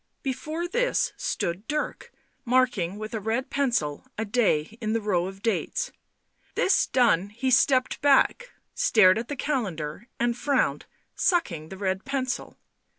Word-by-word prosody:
Before 310 +5 -3
this - - +1
stood 205 - -3
Dirk, 300 0 -3 0.3
marking 240 -8 +1
with 215 +2 -6
a 220 - -1
red 225 +5 -2
pencil 235 - 0
a 220 - -1
day 205 -6 +1
in 215 -1 -1
the 230 - +1
row 185 -5 0
of 195 +1 -10
dates. 485 - -1 0.6
This 380 - +3
done 205 -7 +3
he 250 +5 -2
stepped 260 0 +3
back, 285 - +3 0.2
stared 220 - +5
at 235 - -5
the 290 - -4
calendar 205 - -3
and 240 0 +1
frowned, 280 +2 0 0.3
sucking 175 - 0
the 190 - -8
red 190 0 -1
pencil. 265 -1 -3
235 Hz, 145 wpm, -26 LUFS, 195-275 Hz, 0.6 s, stared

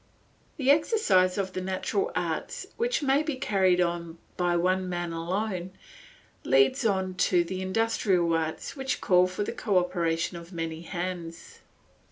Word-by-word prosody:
The 275 -2 +4
exercise 255 - +3
of 190 -2 -2
the 185 - -3
natural 190 - -1
arts, - - -3
which 475 -5 0
may 275 +1 +3
be 305 -2 -2
carried 190 -7 +2
on 170 -1 -1 0.2
by 175 -1 +1
one 185 +1 +1
man 175 -1 -3
alone, 185 +2 -3 0.7
leads 135 +1 +3
on 190 -2 0 0.2
to 175 -2 +4
the 185 +2 -5
industrial 190 -3 +1
arts 160 -1 -2
which 265 -2 -2
call 180 -1 +4
for 185 +3 -3
the - - -3
cooperation 180 -6 0
of 170 +1 -11
many 165 -2 -4
hands. 175 -1 -6
185 Hz, 145 wpm, -27 LUFS, 170-210 Hz, 0.7 s, The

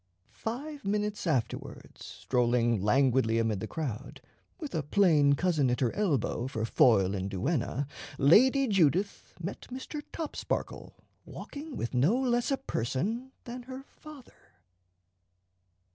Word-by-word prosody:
Five 280 +6 -5
minutes 210 -1 -1
afterwards, 125 -8 -3
strolling 120 +3 0
languidly 120 +1 +3
amid 110 -3 0
the - - -4
crowd, 135 -6 -5 0.4
with 305 -6 -7
a 160 - 0
plain 150 -3 +4
cousin 155 -3 +1
at 125 - 0
her 125 -3 +1
elbow 140 - 0
for 110 -4 -3
foil 100 -5 +4
and 95 0 -3
duenna, 130 - -1 0.3
Lady 255 - +5
Judith 195 - +1
met 180 +3 -6
Mr. 265 +4 -6
Topsparkle 320 -3 -4 0.3
walking 295 0 -8
with 115 - -3
no 140 - +3
less 240 -2 +1
a 275 - +1
person 220 - -3
than 245 +1 -7
her 260 +1 -7
father. 270 - -16
155 Hz, 125 wpm, -29 LUFS, -, 0.4 s, Lady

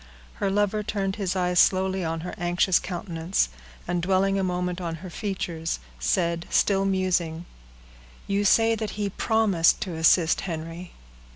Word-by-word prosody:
Her 200 - +2
lover 205 +1 +1
turned 200 -2 -2
his 195 -3 -2
eyes 180 -1 +1
slowly 190 0 +3
on 165 0 -2
her 180 - -6
anxious 175 +1 +2
countenance, 175 - -2 0.4
and 175 -1 -1
dwelling 195 +2 +2
a - - 0
moment 180 0 -2
on 165 -2 -3
her 180 - -8
features, 170 -5 -3 0.2
said, 170 - 0
still 195 -1 +2
musing,— 180 -4 0 0.8
"You 200 +1 0
say 225 +3 +4
that 220 -1 -3
he 205 -1 -1
promised 200 -6 +2
to 185 - -3
assist 160 +1 +3
Henry." 165 0 -6
185 Hz, 150 wpm, -25 LUFS, 170-195 Hz, 0.8 s, say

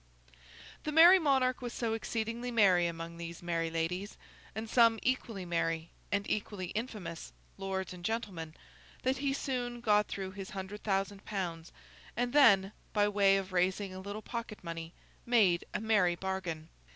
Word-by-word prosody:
The 305 - -2
Merry 340 +5 +9
Monarch 265 -5 +2
was 245 -1 -5
so 230 -2 -1
exceedingly 230 +2 -3
merry 190 -7 +4
among 170 0 -6
these 170 0 -7
merry 165 -1 -1
ladies, 175 +5 -3 0.4
and 220 +1 -4
some 230 0 +5
equally 230 -7 -1
merry 165 -1 -1 0.2
(and 200 0 0
equally 200 -3 -3
infamous) 205 -7 -5 0.3
lords 190 -1 -3
and 175 -1 -11
gentlemen, 180 -7 -3 0.5
that 260 +1 +1
he 275 +1 0
soon 250 -3 -2
got 210 -3 +3
through 190 -1 -4
his 195 -1 -7
hundred 195 +2 -6
thousand 195 0 -1
pounds, 175 -5 -4 0.5
and 245 +1 0
then, 200 -9 +6 0.2
by 205 -1 +3
way 200 -1 +4
of 190 -1 -4
raising 185 +2 +1
a 185 - -7
little 205 +3 -6
pocket 230 -3 -6
money, 165 -1 -6 0.3
made 205 -8 +3
a - - -2
merry 205 -5 +3
bargain. 175 -4 -4
200 Hz, 155 wpm, -32 LUFS, 175-230 Hz, 0.5 s, Merry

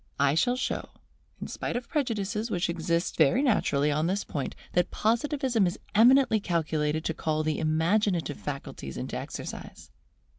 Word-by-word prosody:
I 140 0 +4
shall 245 +11 +2
show, 260 - -3 0.5
in - - -5
spite - - -4
of 245 -1 -3
prejudices 225 -6 -1
which 175 -3 0
exist 170 +1 -1
very 250 - +4
naturally 150 - +2
on 155 +3 +1
this 195 +3 0
point, 140 -3 -4 0.2
that 180 0 +2
Positivism 235 - +1
is 175 - -3 0.2
eminently 240 +1 +5
calculated 160 -4 -1
to 160 - 0
call 155 0 -1
the 155 -1 -1
Imaginative 165 0 +1
faculties 135 - -6
into - - -4
exercise. - - -7
175 Hz, 150 wpm, -28 LUFS, 155-225 Hz, 0.5 s, eminently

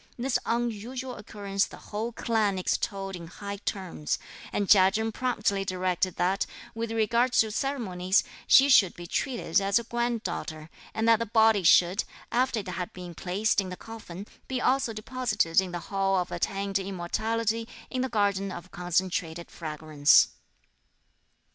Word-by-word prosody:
This 250 +1 0
unusual 240 +2 -2
occurrence 200 -1 -2
the - - -12
whole 220 +3 -4
clan 220 -4 0
extolled 195 +1 -2
in 170 -2 -8
high 200 +3 -7
terms; 185 -6 -3 0.3
and 205 - -1
Chia 190 -1 +7
Chen 220 +3 -1
promptly 210 -5 0
directed 185 -1 -1
that, 190 +2 +1 0.3
with 225 0 -4
regard 235 +3 +2
to 220 -3 +3
ceremonies, 200 -8 0 0.2
she 270 - +7
should 205 -10 +5
be 175 - -8
treated 230 -2 0
as 195 0 +2
a 235 - 0
granddaughter, 220 -10 -3 0.2
and 225 0 0
that 230 -1 +6
the 230 - -2
body 220 -1 +4
should, 180 +2 +5 0.3
after 240 -2 +1
it 200 - -13
had 180 -1 -4
been 180 -1 -8
placed 195 +5 0
in 190 - -6
the 180 - -7
coffin, 205 -4 -9 0.2
be 260 -1 -2
also 265 -1 +2
deposited 215 -6 +1
in 185 -2 -5
the 175 - -3 0.2
Hall 195 0 +2
of 180 -1 -1
Attained 195 +3 -1
Immortality, 220 +5 -2 0.2
in 255 - -1
the 260 - -1
Garden 200 -3 0
of 185 +1 -9
Concentrated 175 -1 -2
Fragrance. 155 -2 +3
200 Hz, 155 wpm, -28 LUFS, 185-230 Hz, 0.3 s, Chia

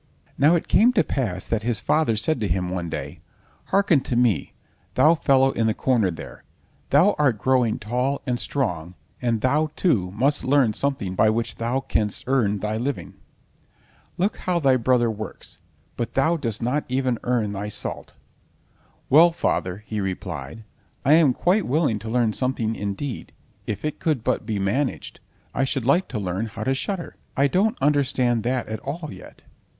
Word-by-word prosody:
Now 150 +5 +4
it 170 - -1
came 240 +3 +5
to 215 - +3
pass 95 -9 -3
that 115 -2 0
his 115 -2 -1
father 150 -1 +1
said 130 +6 0
to 105 - -1
him 90 0 -1
one 90 -2 -3
day: - - -6 0.5
"Hearken 190 -6 +3
to 125 - -3
me, 120 -8 +1 0.4
thou 150 +6 +6
fellow 135 -4 +3
in 115 -3 0
the 110 - +1
corner 120 -7 +2
there, 85 - -9 0.5
thou 170 +9 +5
art 135 -7 +3
growing 125 -1 +2
tall 125 +6 -2
and 125 -3 -1
strong, 90 - -2 0.3
and 115 -3 0
thou, 150 +5 +2
too, 110 - +1
must 140 +7 +1
learn 130 -5 +3
something 130 -8 -2
by 110 +3 +3
which 115 +1 -2
thou 120 +4 -1
canst 105 -6 -1
earn 120 -6 +1
thy 105 +1 -2
living. 135 +4 -3 1.0
Look 195 +4 0
how 180 -1 -1
thy 135 -4 +4
brother 120 -1 +2
works, 110 0 -8 0.4
but 120 -2 -3
thou 150 +5 +3
dost 115 -9 -3
not 135 +5 0
even 130 -2 0
earn 115 -4 0
thy 100 +1 -4
salt." - - -3 0.9
"Well, 165 +5 +7
father," 95 - -2
he 105 -1 -3
replied, 90 -2 -5 0.4
"I 140 - +6
am 155 -4 +6
quite 185 +9 +1
willing 140 -6 +1
to 110 +2 -7
learn 115 -2 +1
something—indeed, 115 -1 -3 0.3
if 105 - -4
it 150 - -3
could 155 -9 0
but - - -1
be 110 -3 -1
managed, 120 +8 -2 0.3
I 135 - 0
should 135 -2 -2
like 170 +8 +3
to 120 - -5
learn 95 +2 -2
how 110 0 -6
to 135 - +1
shudder. 175 +6 -4 0.2
I 140 - +4
don't 200 - +1
understand 130 -5 +2
that 125 0 0
at 110 -1 -4
all 155 +5 -5
yet." - - -14
125 Hz, 175 wpm, -23 LUFS, 110-145 Hz, 1.0 s, Well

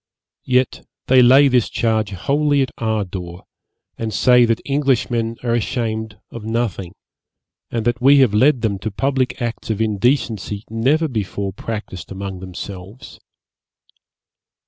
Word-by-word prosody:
Yet 125 0 +1 0.2
they 130 0 +5
lay 135 +3 +7
this 125 -4 +2
charge 110 -2 0
wholly 140 +8 +1
at 130 - -5
our 110 -2 0
door, 90 -1 -8 0.6
and 115 -1 -3
say 125 +3 +5
that 115 -1 +1
Englishmen 125 -5 0
are 120 -2 0
ashamed 110 -2 -2
of 115 - -8
nothing, 110 -5 -3 0.7
and 115 -2 -3
that 120 +1 0
we 140 +3 +6
have 130 -6 +4
led 125 +4 +4
them 100 -3 0
to 110 - -3
public 130 +4 -1
acts 120 -1 -4
of 110 -2 -1
indecency 110 -1 0
never 135 +9 +2
before 100 -5 -3
practised 105 -5 -6
among 95 -1 -6
themselves. 95 +3 -9
115 Hz, 135 wpm, -19 LUFS, 100-130 Hz, 0.7 s, lay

